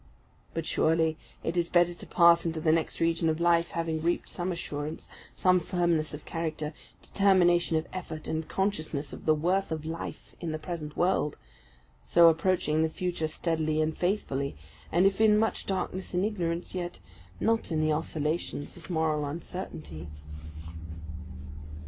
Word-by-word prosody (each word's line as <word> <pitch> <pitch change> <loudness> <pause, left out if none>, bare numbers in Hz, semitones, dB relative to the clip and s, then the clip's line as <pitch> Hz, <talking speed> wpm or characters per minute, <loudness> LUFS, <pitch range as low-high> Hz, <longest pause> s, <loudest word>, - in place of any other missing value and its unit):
But 165 -1 -2
surely 160 0 +2 0.3
it 165 - -1
is 170 -1 +1
better 175 0 +4
to 175 - -11
pass 170 -1 +6
into 165 -1 -1
the 155 0 +3
next 160 0 0
region 165 0 +2
of 160 +1 0
life 170 0 +3
having 165 -1 -2
reaped 170 +2 0
some 180 +1 -2
assurance, 155 -3 -4 0.3
some 185 -1 +4
firmness 170 -3 +1
of 150 0 -7
character, 160 -2 -3 0.3
determination 175 -4 +4
of 160 - -1
effort, 165 -4 -6
and 160 0 -2
consciousness 155 -7 -1
of - - -9
the 155 - +6
worth 180 +4 +1
of 155 -1 -3
life, 165 +1 -6
in 165 -3 -3
the - - -1
present 155 -1 -6
world; 175 -4 +1 0.7
so 170 -1 +7
approaching 165 -2 +2
the 160 - +2
future 170 -1 -2
steadily 155 -1 -1
and 155 0 +1
faithfully, 140 -8 -1 0.4
and 175 +3 +4
if 195 +2 +3
in 215 -1 +6
much 220 +1 0
darkness 190 -1 -2
and 180 +2 +2
ignorance, 175 -5 -2
yet 175 -1 -4 0.4
not 225 -4 +1
in 160 - +1
the 155 0 +2
oscillations 155 -1 -2
of 175 0 -12
moral 160 -3 +1
uncertainty. 115 - -6
165 Hz, 155 wpm, -29 LUFS, 155-175 Hz, 0.7 s, so